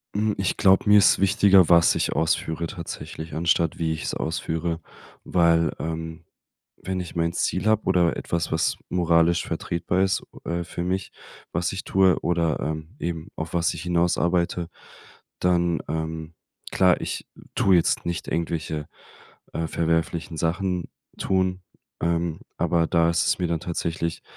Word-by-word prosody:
Hm. 105 0 +1
Ich 95 - -1
glaube, 95 +2 +4
mir 105 - +8
ist 100 - +5
wichtiger, 95 -2 +5
was 85 -1 +6
ich - - 0
ausführe 80 +1 0
tatsächlich, 80 -2 -7
anstatt 85 0 +1
wie 80 -1 0
ich 80 - -6
es - - -3
ausführe, 80 0 -2 0.4
weil, 85 -2 +3
ähm, 80 0 -5 0.6
wenn 95 0 -2
ich 90 - -7
mein 85 0 0
Ziel 95 +3 -1
habe 110 0 +3
oder 85 -2 +2
etwas, 85 -1 -2
was 80 - +1
moralisch 85 -1 +2
vertretbar 85 +2 -1
ist, 95 -1 +1 0.2
äh, 85 +1 -2
für 85 +1 -5
mich, 95 +1 -2 0.4
was 85 +2 -1
ich 95 - -5
tue 95 -2 +3
oder, 85 -3 0
ähm, 80 +4 -4
eben 85 -2 -4
auf 80 +1 -5
was 85 -1 +2
ich 80 - -6
hinaus 85 0 +1
arbeite, 85 -1 0 0.7
dann 85 -2 +2
ähm, 80 +1 -4 0.4
klar, 90 -2 +4
ich - - -4 0.3
tue 95 -2 +4
jetzt 85 - +1
nicht 85 -1 -3
irgendwelche, 80 -2 -2 0.6
äh, 80 - -2
verwerflichen 80 0 -1
Sachen 85 +2 -1 0.3
tun, 95 -1 0 0.4
ähm, 85 -1 0 0.2
aber 85 -1 +2
da 85 -2 +3
ist 85 0 +1
es - - +2
mir 90 - 0
dann 85 -1 -1
tatsächlich 85 -1 -3
85 Hz, 155 wpm, -24 LUFS, 80-90 Hz, 0.7 s, mir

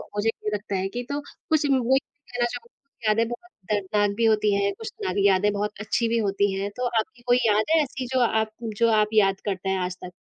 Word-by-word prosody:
मुझे 210 +2 +1
ये 215 - -3
लगता 205 -1 -3
है 190 0 0
कि 245 +3 -4
तो 285 - -1
कुछ 305 +1 -2
वही 265 +1 +3
कहना 245 -4 -5
चाहूँगी 240 0 -8
यादें 225 +2 +3
बहुत 355 +10 -8 0.2
दर्दनाक 205 0 +1
भी 230 - +2
होती 215 -2 +3
हैं, 200 0 +1
कुछ 450 - -9
सारी 385 - -2
यादें 200 +2 +3
बहुत 205 +1 -1
अच्छी 230 +2 0
भी 235 - +1
होती 200 -2 +1
हैं, 195 +1 -2
तो 250 - -1
आपकी 240 +2 -2
कोई 245 0 +5
याद 215 0 +4
है 320 - +5
ऐसी 265 -1 -5
जो 260 - +3
आप 220 -2 +1
जो 230 +1 +1
आप 215 -1 +4
याद 195 -3 +3
करते 195 -1 -2
हैं 190 - +1
आज 180 0 -2
तक? 180 - -6
220 Hz, 230 wpm, -25 LUFS, 200-245 Hz, 0.2 s, कोई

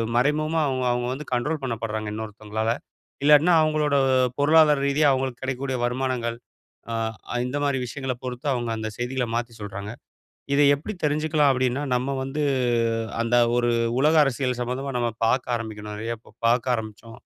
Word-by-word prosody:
மறைமுகமா 155 +5 +2
அவங்க 130 -1 -1
அவங்க 120 0 -1
வந்து 150 +3 -7
கண்ட்ரோல் 150 +5 -1
பண்ணப்பட்றாங்க 110 -3 -3
இன்னொருத்தங்களால. 110 +1 -3 0.5
இல்லாட்னா 150 +4 +6
அவங்களோட 155 -2 +1 0.4
பொருளாதார 150 0 +5
ரீதியா 145 +1 +3
அவங்களுக்கு 130 -2 -2
கெடைக்க 130 -1 -2
கூடிய 130 -2 -1
வருமானங்கள், 125 -2 -2 0.5
அ - - -2 0.5
இந்த 135 +3 -3
மாதிரி 140 -2 +1
விஷயங்கள 130 0 -4
பொறுத்து 125 +3 -5
அவங்க 120 -2 -2
அந்த 110 0 -3
செய்திகள 125 0 -2
மாத்தி 120 -1 -3
சொல்றாங்க. 100 +1 -6 0.6
இத 145 - +4
எப்டி 185 +10 -6
தெரிஞ்ச்சுக்கலாம் 150 -1 +2
அப்டின்னா 130 +2 0
நம்ம 125 +2 -1
வந்து 145 +3 -3 0.8
அந்த 115 +1 +1 0.2
ஒரு 120 0 +2 0.3
உலக 155 +3 +4
அரசியல் 130 -2 -1
சம்மந்தமா 130 +2 -3
நம்ம 120 -1 0
பாக்க 125 +2 +2
ஆரம்பிக்கணும். 105 -2 -7
நெறைய 115 +2 -3
ப - - -19
பாக்க 120 +1 +2
ஆரம்பிச்சோ, 110 0 -8
125 Hz, 150 wpm, -24 LUFS, 115-145 Hz, 0.8 s, இல்லாட்னா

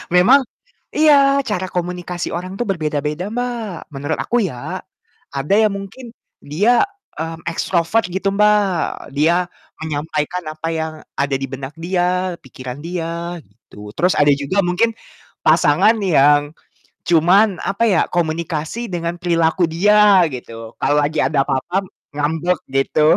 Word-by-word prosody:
Memang 240 +11 +7 0.5
iya, 280 -2 +5
cara 190 -4 -2
komunikasi 180 0 -3
orang 185 +4 -6
itu - - +1
berbeda-beda, 155 +1 -2
Mbak, 235 -7 -4
menurut 145 +2 -3
aku 240 -2 +1
ya. 125 -10 -5 0.5
Ada 140 +7 0
yang 200 - -4
mungkin 230 +5 -10 0.3
dia, 205 +12 +3 0.3
mmm, 165 +1 -6
extrovert 170 +5 0
gitu, 190 +2 -1
Mbak, 210 -4 +1
dia 170 +4 +2 0.3
menyampaikan 155 +2 -3
apa 155 +1 -6
yang 160 0 -2 0.2
ada 140 -1 0
di 135 - -2
benak 135 +1 -7
dia, 180 +1 0
pikiran 130 +1 -9
dia 170 0 -4
gitu. 105 0 -14
Terus 180 +2 +2
ada 145 0 +5
juga 145 +8 -2
mungkin 180 +5 +2 0.5
pasangan 225 +2 +4
yang 145 -4 +4 0.6
cuman, 180 +4 +4
apa 200 +4 0
ya, 185 -6 +3
komunikasi 165 +5 -2
dengan 170 0 -3
perilaku 170 0 +1
dia 200 +1 +5
gitu. 115 -3 -9
Kalau 145 - +1
lagi 150 +2 -1
ada 145 -3 +1
apa-apa 180 +9 -1 0.3
ngambek 160 +5 -1
gitu, 150 +4 +3
170 Hz, 130 wpm, -19 LUFS, 150-195 Hz, 0.6 s, Memang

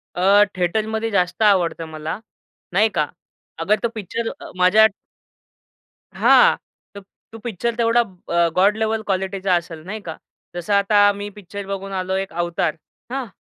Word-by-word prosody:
अ, 200 +3 +5
थिएटरमध्ये 220 +5 -1
जास्त 180 0 0
आवडतं 175 -5 +2
मला, 155 +3 -5 0.5
नाही 215 +4 +4
का, 150 -3 +1 0.5
अगर 205 +6 +2
तो - - +3
पिक्चर 225 +2 -3
अ, - - -10
माझ्या 200 +5 +6 1.3
हां, - - +6 0.4
तर 200 - -8 0.3
तो 225 - -10
पिक्चर 235 +1 -3
तेवढा 235 0 +3
अ, 175 -5 -1
गॉड 200 +3 +4
लेवल 220 0 0
क्वालिटीचा 190 -1 0
असेल 165 -2 -4
नाही 215 +4 -5
का, 165 -5 -7 0.4
जसं 175 +4 -2
आता 205 0 +5
मी 205 +1 -6
पिक्चर 200 0 -9
बघून 195 0 -5
आलो 185 +1 -2
एक 195 -2 -3
Avatar. 170 -2 0 0.4
हां? 265 -3 -3
195 Hz, 150 wpm, -21 LUFS, 180-215 Hz, 1.3 s, माझ्या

